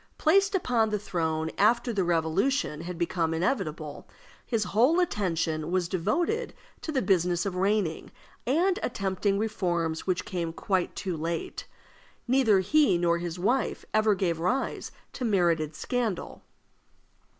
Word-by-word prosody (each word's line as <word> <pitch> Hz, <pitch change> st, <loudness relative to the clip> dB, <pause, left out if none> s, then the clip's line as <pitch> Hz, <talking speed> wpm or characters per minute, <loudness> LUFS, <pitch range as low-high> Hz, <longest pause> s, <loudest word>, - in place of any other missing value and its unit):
Placed 390 Hz, +5 st, +3 dB
upon 240 Hz, -11 st, +2 dB
the 210 Hz, -, 0 dB
throne 160 Hz, -5 st, -2 dB
after 235 Hz, +3 st, +3 dB
the 195 Hz, -3 st, +1 dB
Revolution 170 Hz, -, 0 dB
had 175 Hz, +1 st, -6 dB
become 165 Hz, -1 st, 0 dB
inevitable, 155 Hz, -, -2 dB, 0.4 s
his 225 Hz, -3 st, -1 dB
whole 250 Hz, -, +3 dB
attention 165 Hz, -, -1 dB
was 180 Hz, -1 st, 0 dB
devoted 340 Hz, -, -1 dB, 0.3 s
to 315 Hz, -, -4 dB
the 265 Hz, -4 st, 0 dB
business 180 Hz, -2 st, +2 dB
of 200 Hz, -, -2 dB
reigning, 190 Hz, -3 st, 0 dB, 0.4 s
and 350 Hz, +8 st, +2 dB
attempting 195 Hz, -2 st, -1 dB
reforms 175 Hz, -7 st, -1 dB
which 185 Hz, -2 st, 0 dB
came 170 Hz, -3 st, -3 dB
quite 185 Hz, +1 st, -1 dB
too 185 Hz, -3 st, -3 dB
late. 165 Hz, +1 st, -4 dB, 0.6 s
Neither 240 Hz, -6 st, +4 dB
he 205 Hz, -, +3 dB
nor 170 Hz, 0 st, +1 dB
his 170 Hz, 0 st, -4 dB
wife 240 Hz, +9 st, 0 dB
ever 215 Hz, -1 st, +3 dB
gave 175 Hz, -4 st, -1 dB
rise 215 Hz, +11 st, -1 dB, 0.2 s
to 255 Hz, -, -5 dB
merited 170 Hz, -8 st, +1 dB
scandal. 230 Hz, -2 st, -3 dB
190 Hz, 135 wpm, -27 LUFS, 170-235 Hz, 0.6 s, Neither